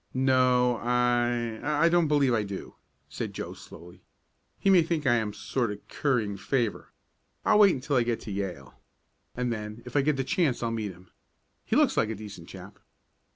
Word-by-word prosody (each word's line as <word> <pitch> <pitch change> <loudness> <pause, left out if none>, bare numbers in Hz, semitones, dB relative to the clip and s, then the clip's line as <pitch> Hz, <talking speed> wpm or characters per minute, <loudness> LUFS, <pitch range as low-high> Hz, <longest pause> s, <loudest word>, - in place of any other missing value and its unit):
"No 125 -2 +3
I 120 -1 0
I 150 +2 +2
don't 170 -1 +3
believe 145 -4 +3
I 110 - +2
do," 100 -2 -6 0.3
said - - -6
Joe - - -5
slowly. 90 +2 -13 0.6
"He - - -3
may 185 -2 +7
think 160 -2 -2
I 125 - +4
am 110 -2 -1
sort 120 +2 -2
of 105 - -10
currying 115 -9 0
favor. 120 +1 -2 0.5
I'll 210 - +5
wait 200 -3 +6
until 140 +1 -1
I - - +4
get 115 -1 -1
to 110 - -7
Yale, 90 -10 -5 0.6
and 125 -1 -1
then, 105 +1 -7
if 125 - -10
I 145 - +5
get 145 0 +1
the 135 - 0
chance, 135 -2 0
I'll 115 - -1
meet 110 -3 -3
him. 90 0 -18 0.5
He - - 0
looks - - +3
like 110 - +2
a 110 - -3
decent 100 -5 -10
chap." 95 +1 -11
120 Hz, 190 wpm, -27 LUFS, 105-135 Hz, 0.6 s, may